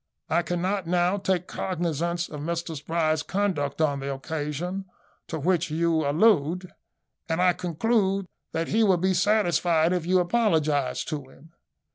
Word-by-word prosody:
"I 170 - +3
cannot 180 +2 -2
now 180 +2 +2
take 190 -2 0
cognisance 170 -2 -2
of 150 - -8
Mr 170 +1 -3
Spry's 155 +1 0
conduct 175 -8 -1
on 145 -3 +1
the 140 +1 -3
occasion 160 +6 -4 0.4
to 160 - -4
which 170 +2 +1
you 160 -1 +1
allude; 180 0 +2 0.6
and 165 +1 0
I 180 0 +4
conclude 195 +3 0 0.3
that 165 0 -2
he 225 - +2
will 190 -4 +4
be 190 +2 +1
satisfied 175 -4 +2
if 175 -2 -2
you 185 +1 +4
apologise 160 - +1
to 145 -4 -5
him. 160 +5 -19
170 Hz, 145 wpm, -26 LUFS, 155-185 Hz, 0.6 s, I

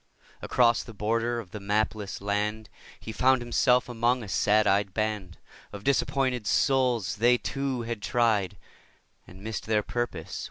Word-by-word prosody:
Across 120 -1 +3
the 115 - -11
border 115 +3 -1
of 100 -6 -10
the 105 - -6
mapless 105 0 -2
land 105 +2 -2 0.3
He 110 - -7
found 130 +4 +3
himself 125 +1 +2
among 120 +1 0
a - - -8
sad 105 +2 +2
eyed 100 -1 +1
band 105 -5 -2 0.3
Of 100 -1 -9
disappointed 130 -3 0
souls; 125 -9 +1
they, 120 +3 +4
too, 135 -2 -3
had 115 -2 -5
tried 105 -4 +1 0.7
And 95 +2 -14
missed 110 0 -5
their 105 -1 +1
purpose. 120 +2 -4
110 Hz, 150 wpm, -27 LUFS, 105-120 Hz, 0.7 s, they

